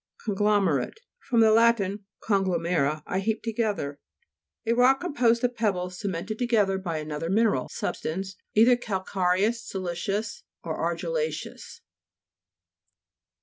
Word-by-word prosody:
CONGLOMERATE 205 Hz, -, +1 dB, 0.2 s
fr. 260 Hz, -, -2 dB
lat. 230 Hz, +1 st, +5 dB, 0.4 s
conglo 195 Hz, -4 st, +1 dB
mero, 155 Hz, -3 st, 0 dB
I 190 Hz, -, -1 dB
heap 215 Hz, +3 st, -1 dB
together. 210 Hz, -11 st, -2 dB, 0.7 s
A 230 Hz, -, +2 dB
rock 255 Hz, +3 st, +4 dB
composed 245 Hz, -9 st, +2 dB
of 245 Hz, 0 st, +1 dB
pebbles 180 Hz, -5 st, -1 dB
cemented 200 Hz, +1 st, -4 dB
to 245 Hz, -, +1 dB
19 -, -, -4 dB
gether 205 Hz, -5 st, +2 dB
by 170 Hz, -4 st, -3 dB
another 155 Hz, +1 st, -4 dB
mineral 205 Hz, -, +2 dB
sub -, -, -3 dB
stance, 190 Hz, +4 st, -4 dB, 0.2 s
either 235 Hz, +4 st, +6 dB
calcareous, 195 Hz, 0 st, 0 dB
siliceous, 195 Hz, +3 st, -3 dB, 0.2 s
or -, -, -3 dB
argilla'ceous. -, -, -3 dB
205 Hz, 120 wpm, -26 LUFS, 180-230 Hz, 0.7 s, either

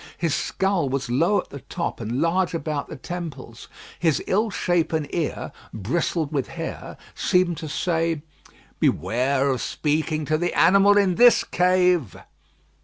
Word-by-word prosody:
His 165 Hz, -3 st, 0 dB
skull 190 Hz, -7 st, 0 dB
was 135 Hz, -2 st, -3 dB
low 170 Hz, +11 st, +3 dB
at -, -, -20 dB
the 140 Hz, -, -7 dB
top -, -, -5 dB
and 115 Hz, +3 st, -3 dB
large 170 Hz, +2 st, +1 dB
about 150 Hz, -2 st, -3 dB
the -, -, -7 dB
temples. 145 Hz, -6 st, -7 dB, 0.3 s
His 160 Hz, -4 st, +2 dB
ill 215 Hz, +4 st, +1 dB
shapen 165 Hz, -5 st, 0 dB
ear, 165 Hz, -4 st, -3 dB, 0.2 s
bristled 145 Hz, -, -1 dB
with 140 Hz, -4 st, -1 dB
hair, -, -, -7 dB, 0.2 s
seemed 180 Hz, -2 st, +1 dB
to 155 Hz, -1 st, -6 dB
say, 165 Hz, -1 st, -1 dB, 0.6 s
"Beware 130 Hz, -, +1 dB
of 130 Hz, -3 st, -2 dB
speaking 155 Hz, 0 st, -1 dB
to 155 Hz, +1 st, 0 dB
the 175 Hz, +1 st, -1 dB
animal 195 Hz, +4 st, +5 dB
in 190 Hz, -3 st, +2 dB
this 245 Hz, -1 st, +7 dB
cave." 180 Hz, -, +2 dB
160 Hz, 145 wpm, -23 LUFS, 140-180 Hz, 0.6 s, this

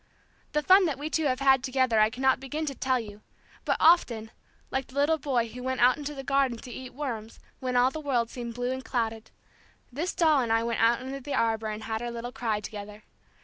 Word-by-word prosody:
The 300 Hz, 0 st, +1 dB
fun 375 Hz, +3 st, +6 dB
that 290 Hz, -5 st, -2 dB
we 300 Hz, +2 st, -5 dB
two 320 Hz, 0 st, +1 dB
have 255 Hz, -1 st, 0 dB
had 265 Hz, -1 st, +5 dB
together 255 Hz, -4 st, +2 dB
I 215 Hz, 0 st, +5 dB
cannot 260 Hz, +2 st, +1 dB
begin 295 Hz, +4 st, -4 dB
to 280 Hz, -, -3 dB
tell 260 Hz, -1 st, 0 dB
you, 210 Hz, -2 st, -9 dB, 0.4 s
but -, -, +1 dB
often, 240 Hz, -10 st, +4 dB, 0.4 s
like 265 Hz, 0 st, -2 dB
the 260 Hz, -, -16 dB
little 295 Hz, +3 st, +2 dB
boy 250 Hz, -5 st, 0 dB
who 250 Hz, +2 st, -9 dB
went 260 Hz, 0 st, -2 dB
out 245 Hz, +1 st, +6 dB
into 295 Hz, 0 st, -6 dB
the 270 Hz, -, -6 dB
garden 270 Hz, -3 st, +1 dB
to 245 Hz, -, -10 dB
eat 255 Hz, +1 st, -8 dB
worms 235 Hz, -6 st, -5 dB, 0.2 s
when 255 Hz, -1 st, -3 dB
all 250 Hz, +1 st, +4 dB
the 315 Hz, -, -6 dB
world 245 Hz, -5 st, 0 dB
seemed 235 Hz, -2 st, -6 dB
blue 245 Hz, +1 st, -2 dB
and 260 Hz, 0 st, -4 dB
clouded, 225 Hz, -3 st, -2 dB, 0.6 s
this 315 Hz, +9 st, -3 dB
doll 310 Hz, -5 st, +4 dB
and 235 Hz, -2 st, -1 dB
I 225 Hz, 0 st, +3 dB
went 235 Hz, 0 st, -1 dB
out 235 Hz, +2 st, +4 dB
under 265 Hz, +1 st, -5 dB
the 275 Hz, +1 st, -4 dB
arbor 225 Hz, -2 st, +1 dB
and 215 Hz, 0 st, -5 dB
had 220 Hz, 0 st, -3 dB
our 240 Hz, -, -3 dB
little 235 Hz, +1 st, -6 dB
cry 225 Hz, -5 st, -1 dB
together. 210 Hz, 0 st, -8 dB
255 Hz, 230 wpm, -28 LUFS, 230-275 Hz, 0.6 s, fun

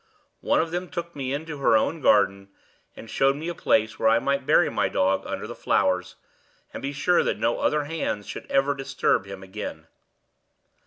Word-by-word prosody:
One -, -, +2 dB
of 165 Hz, 0 st, -1 dB
them 175 Hz, +1 st, -3 dB
took 170 Hz, -1 st, -6 dB
me 135 Hz, -2 st, -3 dB
into 150 Hz, +1 st, -4 dB
her 115 Hz, -5 st, +4 dB
own 160 Hz, +8 st, -1 dB
garden, 100 Hz, -4 st, +3 dB, 0.5 s
and -, -, -11 dB
showed 135 Hz, +4 st, +2 dB
me 160 Hz, +4 st, -5 dB
a -, -, -3 dB
place 110 Hz, -8 st, +1 dB
where 110 Hz, -, +4 dB
I 115 Hz, -, +5 dB
might 140 Hz, +3 st, -1 dB
bury 160 Hz, +2 st, +5 dB
my 100 Hz, -2 st, 0 dB
dog 95 Hz, +1 st, +1 dB
under -, -, -4 dB
the -, -, -6 dB
flowers, 90 Hz, 0 st, 0 dB, 0.6 s
and -, -, -6 dB
be 140 Hz, -, -3 dB
sure 175 Hz, +5 st, +2 dB
that -, -, -1 dB
no 120 Hz, -, 0 dB
other 150 Hz, -1 st, +1 dB
hands 145 Hz, -9 st, -3 dB
should -, -, -8 dB
ever 135 Hz, +1 st, +2 dB
disturb 135 Hz, -7 st, 0 dB
him 100 Hz, -1 st, -8 dB
again. 95 Hz, -5 st, -7 dB
135 Hz, 195 wpm, -25 LUFS, 105-150 Hz, 0.6 s, I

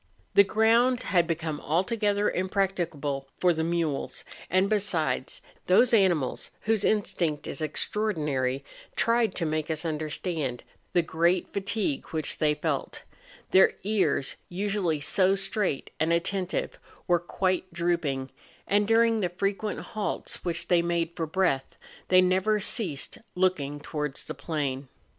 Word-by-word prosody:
The 200 Hz, -, +8 dB
ground 230 Hz, +5 st, +3 dB
had 175 Hz, -3 st, +2 dB
be¬ 165 Hz, -2 st, 0 dB
come 160 Hz, -2 st, -4 dB
altogether 205 Hz, +5 st, +1 dB
impracticable 175 Hz, -8 st, -1 dB
for 180 Hz, -1 st, +3 dB
the, 160 Hz, 0 st, -1 dB
mules; 165 Hz, -4 st, -1 dB, 0.3 s
and, 185 Hz, +2 st, +3 dB
besides, 175 Hz, -11 st, -1 dB, 0.3 s
those 230 Hz, +7 st, +5 dB
animals, 175 Hz, -, +2 dB
whose 220 Hz, -2 st, +1 dB
instinct 175 Hz, -8 st, 0 dB
is 140 Hz, -, -4 dB
extraor¬ 210 Hz, +7 st, -1 dB
dinary, 135 Hz, -3 st, -1 dB, 0.3 s
tried 230 Hz, -3 st, +2 dB
to 170 Hz, -, -1 dB
make 155 Hz, 0 st, -1 dB
us 160 Hz, +1 st, -2 dB
understand 155 Hz, -3 st, -3 dB, 0.3 s
the 175 Hz, -2 st, +3 dB
great 170 Hz, +3 st, +1 dB
fa¬ 200 Hz, -, -2 dB
tigue 200 Hz, -8 st, -1 dB
which 155 Hz, -2 st, -2 dB
they 150 Hz, -1 st, +3 dB
felt; 150 Hz, -, -3 dB, 0.5 s
their 190 Hz, -, +6 dB
ears, 190 Hz, -9 st, +1 dB
usually 185 Hz, -4 st, -1 dB
so 185 Hz, +6 st, +3 dB
straight 195 Hz, -6 st, -1 dB
and 160 Hz, +1 st, +2 dB
attentive, 180 Hz, +2 st, -1 dB, 0.3 s
were 175 Hz, -2 st, +3 dB
quite 185 Hz, +1 st, -1 dB
drooping, 170 Hz, -6 st, -1 dB, 0.3 s
and, 205 Hz, 0 st, +2 dB
during 225 Hz, 0 st, +4 dB
the 180 Hz, -4 st, 0 dB
frequent 200 Hz, +3 st, -2 dB
halts 215 Hz, -2 st, -4 dB
which 175 Hz, -2 st, -2 dB
they 175 Hz, -2 st, +4 dB
made 170 Hz, -1 st, 0 dB
for 165 Hz, -2 st, -2 dB
breath, 160 Hz, -6 st, 0 dB, 0.3 s
they 185 Hz, 0 st, +6 dB
never 190 Hz, +4 st, +2 dB
ceased 185 Hz, -, -1 dB, 0.2 s
looking 155 Hz, -6 st, 0 dB
towards 150 Hz, -2 st, -3 dB
the -, -, -5 dB
plain. 140 Hz, -2 st, -3 dB
175 Hz, 140 wpm, -27 LUFS, 155-200 Hz, 0.5 s, The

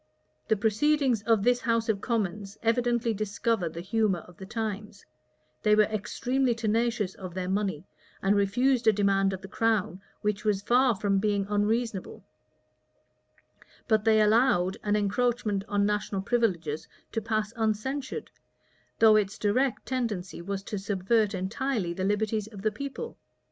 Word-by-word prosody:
[*] -, -, -44 dB
The 220 Hz, -, +3 dB
proceedings 240 Hz, +3 st, +2 dB
of 225 Hz, -3 st, +3 dB
this 245 Hz, +1 st, +3 dB
house 230 Hz, -2 st, +1 dB
of 210 Hz, -3 st, 0 dB
commons 205 Hz, -3 st, -2 dB
evidently 235 Hz, 0 st, +1 dB
discover 210 Hz, -2 st, -1 dB
the 165 Hz, +1 st, -7 dB
humor 200 Hz, -2 st, 0 dB
of 180 Hz, 0 st, -17 dB
the 190 Hz, -, -9 dB
times: 215 Hz, -2 st, -5 dB, 0.6 s
they 210 Hz, 0 st, +4 dB
were 215 Hz, -, +6 dB
extremely 235 Hz, +5 st, -1 dB
tenacious 225 Hz, -3 st, 0 dB
of 185 Hz, -2 st, -9 dB
their 185 Hz, -1 st, -3 dB
money, 190 Hz, -4 st, -1 dB, 0.3 s
and 195 Hz, +1 st, +2 dB
refused 240 Hz, +5 st, +2 dB
a -, -, +9 dB
demand 195 Hz, -1 st, +2 dB
of 190 Hz, 0 st, -6 dB
the -, -, -7 dB
crown 215 Hz, -3 st, 0 dB, 0.2 s
which 210 Hz, -1 st, -1 dB
was 205 Hz, -2 st, 0 dB
far 245 Hz, 0 st, +4 dB
from 195 Hz, -1 st, +1 dB
being 205 Hz, -1 st, 0 dB
unreasonable; 210 Hz, 0 st, -1 dB, 1.6 s
but 220 Hz, -3 st, +3 dB
they 220 Hz, 0 st, +4 dB
allowed 210 Hz, -4 st, +3 dB
an 210 Hz, 0 st, +1 dB
encroachment 210 Hz, 0 st, 0 dB
on 205 Hz, 0 st, +1 dB
national 210 Hz, -2 st, -1 dB
privileges 170 Hz, -10 st, 0 dB, 0.2 s
to 225 Hz, -, -2 dB
pass 215 Hz, 0 st, -1 dB
uncensured, 230 Hz, +5 st, -2 dB, 0.7 s
though 220 Hz, -1 st, +6 dB
its 205 Hz, -2 st, +1 dB
direct 245 Hz, +5 st, 0 dB
tendency 220 Hz, -10 st, -3 dB
was 195 Hz, +2 st, -4 dB
to 205 Hz, 0 st, -4 dB
subvert 205 Hz, +2 st, +1 dB
entirely 200 Hz, 0 st, -2 dB
the 185 Hz, +2 st, -4 dB
liberties 210 Hz, +1 st, 0 dB
of 205 Hz, -3 st, -11 dB
the 215 Hz, -, +2 dB
people. 280 Hz, -, -6 dB
210 Hz, 150 wpm, -28 LUFS, 195-230 Hz, 1.6 s, a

